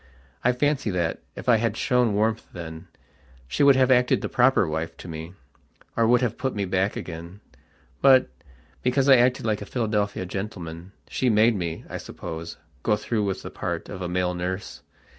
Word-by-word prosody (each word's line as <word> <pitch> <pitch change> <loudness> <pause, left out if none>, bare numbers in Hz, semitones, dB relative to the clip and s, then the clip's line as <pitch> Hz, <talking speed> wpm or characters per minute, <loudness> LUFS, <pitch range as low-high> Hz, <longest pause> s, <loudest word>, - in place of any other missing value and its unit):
I 125 - +4
fancy 140 -1 0
that, 85 -4 -1 0.2
if - - -9
I 120 -2 +6
had 110 -1 -1
shown 125 -6 +2
warmth 110 +1 0
then, 80 0 -8 0.6
she 65 - -2
would 140 -1 +7
have 130 0 +4
acted 125 -1 +4
the - - -3
proper 125 -6 +4
wife 80 +2 -3
to - - -10
me, 80 +2 -7 0.6
or 115 -1 +3
would 120 +1 +4
have 120 -3 -1
put 130 -1 -2
me 100 -1 -1
back 95 +2 0
again. 85 +3 -7 0.6
But, 135 -2 +6 0.5
because 130 +2 +2
I 135 -2 +8
acted 125 0 +2
like 105 -2 0
a - - -5
Philadelphia 105 -5 -1
gentleman, 90 -3 -6 0.2
she 130 - 0
made 110 +1 +4
me, 85 -4 -4
I - - -5
suppose, 80 +1 -7 0.2
go 105 - +2
through 105 0 -1
with 95 -1 -3
the - - -7
part - - -4
of 95 - -7
a 90 - -3
male 90 0 0
nurse. 90 +2 -4
105 Hz, 185 wpm, -25 LUFS, 90-125 Hz, 0.6 s, I